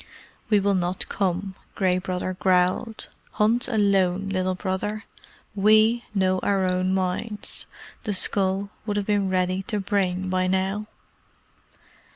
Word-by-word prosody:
"We 210 -2 +5
will 200 0 +2
not 180 0 -1
come," 190 0 -1 0.2
Gray 185 -2 +2
Brother 185 0 -3
growled. 185 +5 +1 0.3
"Hunt 225 +4 +2
alone, 195 -4 +2
Little 185 -1 0
Brother. 205 +3 -3 0.5
WE 215 +3 +4
know 185 -1 +2
our 195 0 +1
own 185 0 +1
minds. 190 +3 -2 0.4
The 210 - -1
skull 195 +1 0 0.2
would 205 -1 -1
have 205 - -1
been 205 -2 +1
ready 185 0 0
to 210 +2 -2
bring 190 -2 0
by 185 0 +1
now." 190 +3 -1
190 Hz, 130 wpm, -24 LUFS, 185-205 Hz, 0.5 s, We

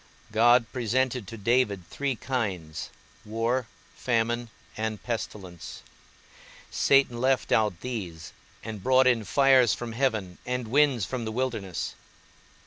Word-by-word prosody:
God 120 +2 +5
presented 125 -1 0
to 115 - -8
David 105 -4 +1
three 140 -2 -2
kinds, 95 - -3 0.3
war, 115 +3 -1 0.3
famine 120 0 0 0.3
and 110 0 -2
pestilence; 100 -7 -6 0.9
Satan 135 -4 +3
left 130 0 +1
out 105 -5 +2
these, 90 -11 -6 0.3
and 110 -2 -6
brought 130 +4 +4
in 120 -3 +3
fires 130 +1 +5
from 120 -1 -6
heaven 110 -7 -1
and 125 -2 -3
winds 135 -5 +3
from 125 +1 -4
the 110 - -3
wilderness. 110 -7 -3
115 Hz, 120 wpm, -27 LUFS, 105-130 Hz, 0.9 s, God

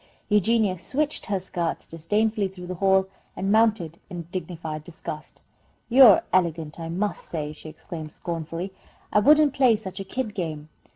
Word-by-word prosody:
Eugenia 210 -2 +2
switched 295 - -1
her 200 -2 0
skirts 175 -2 -3
disdainfully 205 +5 0
through 185 -1 -10
the 180 - -4
hall, 190 +1 +3 0.3
and 195 +1 -1
mounted 215 -7 +2
in 175 -2 -6
dignified 165 -4 -5
disgust. 155 -2 -8 0.5
"You're 245 -4 +8
elegant, 165 -4 0
I 165 0 -5
must 195 +5 -2
say!" 150 -2 -3
she 155 - -11
exclaimed, 155 0 -8
scornfully. 165 +3 -5 0.4
"I - - +6
wouldn't 295 +4 +5
play 260 -5 +5
such 195 -3 -7
a - - -3
kid 215 +3 -4
game!" 160 -6 -4
185 Hz, 155 wpm, -25 LUFS, 165-215 Hz, 0.5 s, You're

